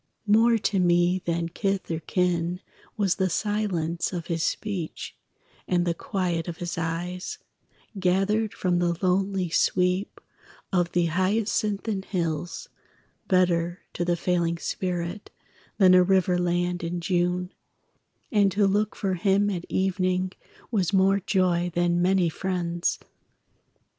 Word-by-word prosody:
More 225 +2 +5
to 200 -2 0
me 175 +1 +3
than 170 0 -1
kith 195 0 -2
or 160 - -1
kin 175 0 0 0.4
Was 200 -4 +1
the 190 -1 +1
silence 180 -4 -1
of 175 -3 -4
his 165 -2 -2
speech; 180 -1 -3 0.5
And 175 -1 +1
the 170 - +1
quiet 175 -2 -2
of 170 -1 -5
his 175 -1 -4
eyes, 170 +2 -3 0.6
Gathered 195 +4 +1
from 180 -2 0
the 170 -1 0
lonely 190 0 +1
sweep 180 +3 +1 0.5
Of 175 -2 +1
the 175 -1 +2
hyacinthine 200 +3 0
hills, 170 -3 -3 0.6
Better 175 -1 +2
to 175 - -2
the 175 0 0
failing 170 -1 0
spirit 180 +2 -3 0.5
Than 185 -3 +6
a 180 - +7
river 180 -1 +2
land 175 0 0
in 170 +1 -2
June: 180 +1 0 0.8
And 205 -3 +3
to 205 0 +3
look 205 +2 +1
for 195 -2 -1
him 195 +3 +2
at 175 -3 -4
evening 185 -1 0 0.4
Was 195 -6 +1
more 195 0 +4
joy 180 -3 +1
than 175 0 +2
many 185 -1 +3
friends. 175 0 -1
180 Hz, 130 wpm, -26 LUFS, 175-195 Hz, 0.8 s, a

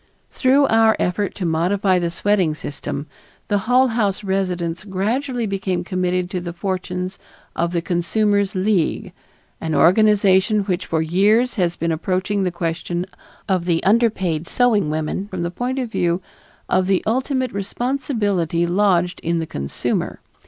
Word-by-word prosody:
Through 275 +2 +3
our 225 -2 +4
efforts 195 +3 -1
to 185 - -3
modify 180 +3 +2
the 170 -1 -1
sweating 180 -2 +1
system, 145 -1 -5 0.4
the 205 -1 +2
Hull 255 +1 +5
House 210 -3 0
residents 180 -3 -2
gradually 230 +6 -1
became 195 -3 -2
committed 180 0 -1
to 180 - -2
the 175 -1 -5
fortunes 185 0 -4 0.4
of 170 +1 0
the 170 -1 -1
Consumers' 200 +3 +1
League, 185 -3 0 0.5
an 160 -1 -2
organization 205 +1 +4
which 190 -2 -2
for 160 -1 0
years 210 +9 +3
has 175 -3 0
been 165 0 -1
approaching 185 +5 -1
the 185 - +1
question 170 +1 -3 0.4
of 185 -3 0
the 170 -2 +1
underpaid 190 -7 +1
sewing 220 -9 +2
woman 155 +5 -2
from 185 -4 -4
the 170 - -2
point 245 +8 -3
of 250 -4 -3
view 175 -4 +1 0.5
of 185 0 +2
the 190 -1 +2
ultimate 260 +2 0
responsibility 200 - -1
lodged 180 -1 +2
in 170 +1 -1
the 165 - -1
consumer. 70 - -3
190 Hz, 145 wpm, -21 LUFS, 175-210 Hz, 0.5 s, Hull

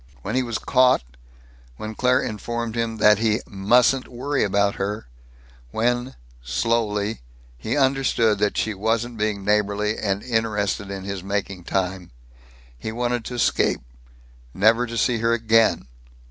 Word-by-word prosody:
When 105 - -3
he 130 - +3
was 120 -3 -2
caught, 130 - +3 0.7
when 110 0 -6
Claire 125 +3 +2
informed 115 +2 -4
him 115 -1 -2
that 105 -1 +5
he 110 0 +2
"mustn't 120 +6 +2
worry 135 +3 -1
about 100 0 +1
her"; 105 +2 -3 0.6
when, 120 - -1 0.3
slowly, 105 - -1 0.3
he 110 - -3
understood 130 -6 +2
that 105 0 0
she 110 - 0
wasn't 115 +3 -1
being 105 -2 -1
neighborly 105 +1 +1
and 100 -1 -1
interested 105 -4 -1
in 100 -1 -5
his 100 -1 -4
making 95 -2 -3
time, 95 -1 -2 0.7
he 110 - -6
wanted 120 +1 -1
to 125 - -5
escape, 120 - +1 0.7
never 115 +5 +4
to 115 0 -5
see 115 +1 +1
her 115 +1 +2
again. 115 - +3
110 Hz, 140 wpm, -23 LUFS, 100-120 Hz, 0.7 s, that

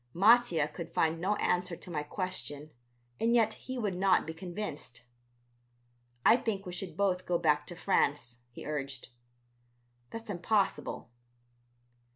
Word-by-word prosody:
Mattia 195 -5 +5
could 165 +2 -7
find 165 0 +1
no 200 +4 +2
answer 180 -2 0
to 175 - -10
my 150 -3 -1
question 155 -3 -4 0.5
and 230 +1 +3
yet 220 -2 +4
he 260 +3 -7
would 210 -5 -1
not 185 0 +3
be 160 - -5
convinced. 170 - -6 1.2
"I 230 - +8
think 210 -5 -2
we 180 - -6
should 175 -2 -6
both 185 -2 +1
go 175 - +2
back 150 -2 +2
to 175 - -7
France," 145 -9 +1
he 120 - -10
urged. 140 -3 -4 1.0
"That's 225 -1 -6
impossible." 195 - 0
180 Hz, 140 wpm, -31 LUFS, 155-200 Hz, 1.2 s, I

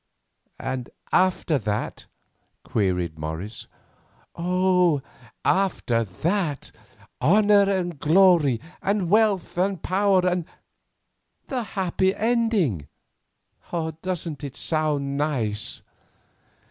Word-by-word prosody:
"And 130 -2 -4 0.2
after 185 -5 +2
that?" 105 -2 -3 0.6
queried 90 -6 -1
Morris. 80 +8 -5 0.7
"Oh, 180 -3 +2 0.4
after 175 -12 +1
that, 155 - -2 0.5
honour 200 +6 +5
and 175 -5 -2
glory 165 -7 +4 0.2
and 195 -3 0
wealth 205 -5 +2
and 190 0 +1
power 190 -1 +2
and—the 180 +7 -6
happy 190 -3 0
ending. 215 - +1 1.1
Doesn't 170 -5 -4
it 140 -2 -6
sound 150 -3 -1
nice?" 120 -8 -2
170 Hz, 80 wpm, -24 LUFS, 130-190 Hz, 1.1 s, honour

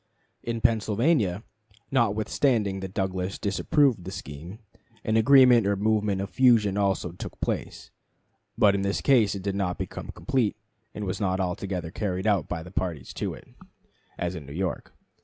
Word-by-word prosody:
In 115 -1 -3
Pennsylvania, 110 - +2 0.5
notwithstanding 110 -3 +1
that 95 0 -7
Douglas 95 -1 -2
disapproved 115 - +1
the - - -6
scheme, 75 +8 -8 0.5
an 110 - 0
agreement 125 -2 +6
or 100 - +2
movement 105 -1 +1
of 100 - -5
fusion 115 -6 +4
also 100 -4 0
took 90 - -9
place; - - -4 0.7
but 100 -2 +5
in 100 - 0
this 100 0 0
case 115 -8 +3
it 95 - -6
did 100 -1 -1
not 95 -2 -1
become - - -6
complete, 130 -7 -1 0.4
and 105 - -4
was 95 +3 -3
not 95 -1 0
altogether 90 -2 -3
carried 95 -1 -3
out 100 -8 +1
by 80 -2 -3
the 90 - -11
parties 85 -8 -3
to - - -3
it, - - -16 0.7
as 85 0 -2
in 80 -6 -8
New 70 - -8
York. 95 +2 -3
100 Hz, 160 wpm, -26 LUFS, 95-110 Hz, 0.7 s, agreement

